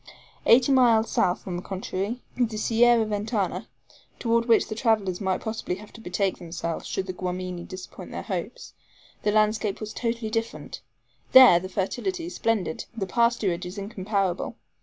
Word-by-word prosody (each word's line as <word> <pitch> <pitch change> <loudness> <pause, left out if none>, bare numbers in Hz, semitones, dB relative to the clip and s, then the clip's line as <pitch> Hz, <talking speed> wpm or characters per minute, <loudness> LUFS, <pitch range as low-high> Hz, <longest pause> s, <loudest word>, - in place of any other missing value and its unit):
Eighty 250 +3 +6
miles 235 -4 +4
south, 180 - +1
on 180 -2 -3
the - - -5
contrary, 195 +5 -4
the 230 -3 0
Sierra 230 +1 +4
Ventana, 210 -1 -2 0.5
toward 230 0 +1
which 230 - +4
the - - -4
travelers 215 -5 +1
might 190 -2 0
possibly 220 -4 -3
have 210 +2 -13
to 230 - -12
betake 190 -1 -1
themselves 170 -1 -4
should 190 - -2
the 185 - -5
Guamini 180 -1 -4
disappoint 185 -1 -9
their - - -6
hopes, - - -5 0.5
the 210 - +1
landscape 215 -1 +1
was 215 -1 -6
totally 230 -2 -2
different. 225 0 -4 0.5
There 255 -10 +10
the 185 +1 -7
fertility 250 - -2
is 350 - -6
splendid; 215 -8 -1
the 195 - -1
pasturage 215 -4 +1
is 180 +3 -8
incomparable. 195 -2 -2
215 Hz, 160 wpm, -26 LUFS, 185-230 Hz, 0.5 s, There